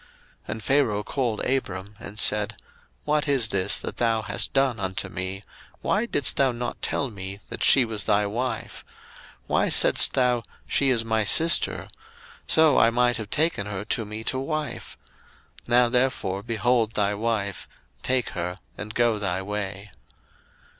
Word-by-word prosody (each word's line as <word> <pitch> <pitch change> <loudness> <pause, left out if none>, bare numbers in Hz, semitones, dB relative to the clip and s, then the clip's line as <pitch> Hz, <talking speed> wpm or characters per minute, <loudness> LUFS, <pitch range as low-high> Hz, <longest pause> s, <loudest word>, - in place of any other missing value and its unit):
01:012:018 - - -27 0.4
And 110 0 -5
Pharaoh 120 -5 +1
called 120 -4 -2
Abram 100 -6 -3
and 100 +1 -10
said, 105 0 +3 0.5
What 150 0 0
is 130 -6 +1
this 95 -2 +2
that - - -6
thou 115 -2 +1
hast 105 0 -1
done 135 -4 +1
unto 95 0 -3
me? 95 +2 -5 0.4
why 215 +4 0
didst 145 - +2
thou 135 -2 +3
not 120 0 -5
tell 140 -3 -1
me 100 -1 -7
that - - -7
she 130 -3 +6
was 110 -3 -5
thy 105 -1 +2
wife? 115 +2 -4
01:012:019 - - -25 0.5
Why - - +1
saidst - - +5
thou, 125 -2 +1 0.2
She 140 - +1
is 115 -3 +1
my 110 -1 +1
sister? 165 - +4 0.6
so 160 -3 +5
I - - +5
might 120 +1 +1
have 110 -3 -7
taken 150 -10 0
her 100 0 -5
to 115 - -1
me 110 +1 -7
to 130 - -1
wife: 150 -2 -5 0.7
now 120 0 +4
therefore 120 -6 0
behold 115 0 0
thy 105 -2 0
wife, 105 -3 -3 0.3
take 130 -1 0
her, 90 +2 -5 0.2
and 105 +1 -8
go 120 -3 +2
thy 95 -2 -2
way. 100 0 -5
115 Hz, 160 wpm, -24 LUFS, 100-125 Hz, 0.7 s, she